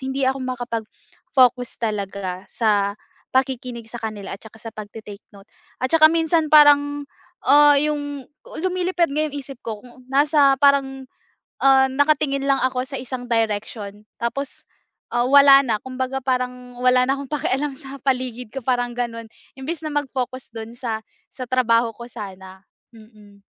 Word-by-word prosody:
hindi 265 +1 -2
ako 265 0 -2
makapag-focus 245 +1 -1
talaga 195 -3 -4
sa 205 -2 +1 0.4
pakikinig 255 -3 -1
sa 240 - -6
kanila 215 -3 -5
at - - -31
saka 220 0 -14
sa 225 - -7
pagta-take 215 -1 -10
note. 200 +2 -17 0.4
At 260 - -1
saka 315 -1 +8
minsan 325 -1 +1
parang, 290 -1 +6 0.4
ah, 290 0 +7
yung 290 -1 -2 0.2
lumilipad 360 0 -1
nga 300 +2 0
yung 290 - -11
isip 275 -2 -8
ko, 220 -2 -4
kung 250 0 -17
nasa 280 0 +4
parang, 270 -2 +2 0.6
ah, 265 -1 +6
nakatingin 280 0 +1
lang 275 -1 +3
ako 255 -1 0
sa 275 - -6
isang 255 0 -6
direction, 210 -2 -2 0.2
tapos, 275 +4 -3 0.5
ah, 240 0 +1
wala 275 0 +8
na 220 -3 0
kumbaga 260 +1 -3
parang 250 -1 -3
wala 250 0 +4
na 270 - +2
akong 280 -1 -8
pakialam 285 0 -1
sa 270 +1 -10
paligid 250 -3 -2
ko 270 - -4
parang 245 -1 0
ganun, 230 -2 -4 0.3
imbis 315 +5 -5
na 310 - -3
mag-focus 260 -3 -3
dun 225 +1 -8
sa 225 -3 -3 0.3
sa 255 - -6
trabaho 235 -2 +3
ko 235 - -8
sana. 190 -3 -9 0.3
Mm. 215 -2 -18
255 Hz, 150 wpm, -22 LUFS, 225-280 Hz, 0.6 s, saka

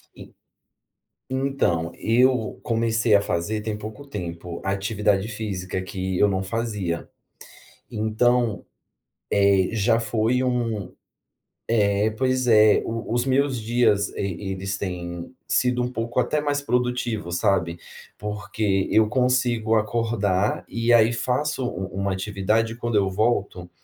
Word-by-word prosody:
E - - -13 1.0
então, 130 -12 0
eu 125 0 +2
comecei 115 -1 +1
a 100 - +5
fazer, 105 +4 -2
tem 110 -1 -3
pouco 110 +7 -8
tempo, 85 -7 -6
atividade 100 +1 0
física, 95 -6 -4
que 95 0 -3
eu - - +5
não 95 -1 -1
fazia. 105 -5 -3 0.8
Então, 110 +1 +1 0.7
eh, 100 -2 +3
já 115 +2 +2
foi 115 +2 +1
um 115 -7 -1 0.9
Eh, 100 +1 +2
pois 130 +2 0
é, 110 -2 +6
o 115 0 -4
os 120 0 +2
meus 135 -2 +1
dias, 110 -3 +2
e 95 0 -3
eles 95 0 -4
têm 85 0 -5 0.2
sido 125 -1 +1
um 125 - -2
pouco 120 +1 -2
até 145 +5 +1
mais 145 -1 0
produtivo, 125 -7 -1
sabe. 85 -1 +1 0.4
Porque 105 -2 -1
eu 110 0 +5
consigo 120 -2 +1
acordar 110 -3 0
e, 115 +1 0
aí, 115 0 +5
faço 130 +3 -1
u 95 -5 -4
u - - -5
uma 100 0 0
atividade 105 +4 0
e - - -10
quando 120 -2 -2
eu 100 -2 +3
volto, 100 -4 -1
110 Hz, 130 wpm, -24 LUFS, 95-120 Hz, 1.0 s, é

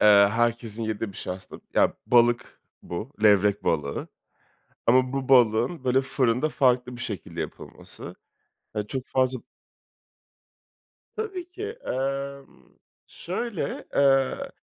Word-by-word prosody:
eee, 105 - +7 0.2
herkesin 115 -1 0
yediği 110 -1 -3
bir - - -14
şey - - -4
aslında. 95 0 -10
Ya - - +4
balık 120 0 +3 0.2
bu, 105 +11 -6
levrek 105 -1 +4
balığı. 75 -3 -1 0.8
Ama 130 +2 +4
bu 135 -1 -3
balığın 125 +4 +4
böyle 130 +1 +3
fırında 130 +1 +1
farklı 125 -3 +2
bir 120 - -8
şekilde 100 -6 -5
yapılması. - - -8 0.6
He, 105 -1 -2
çok 130 +3 -4
fazla 130 -1 +1 1.8
Tabii 380 -5 -4
ki, 380 +3 -8 0.2
emm, 135 +1 -4 0.4
şöyle, 185 -2 -4
eee, 135 -1 +3
125 Hz, 115 wpm, -26 LUFS, 110-135 Hz, 1.8 s, eee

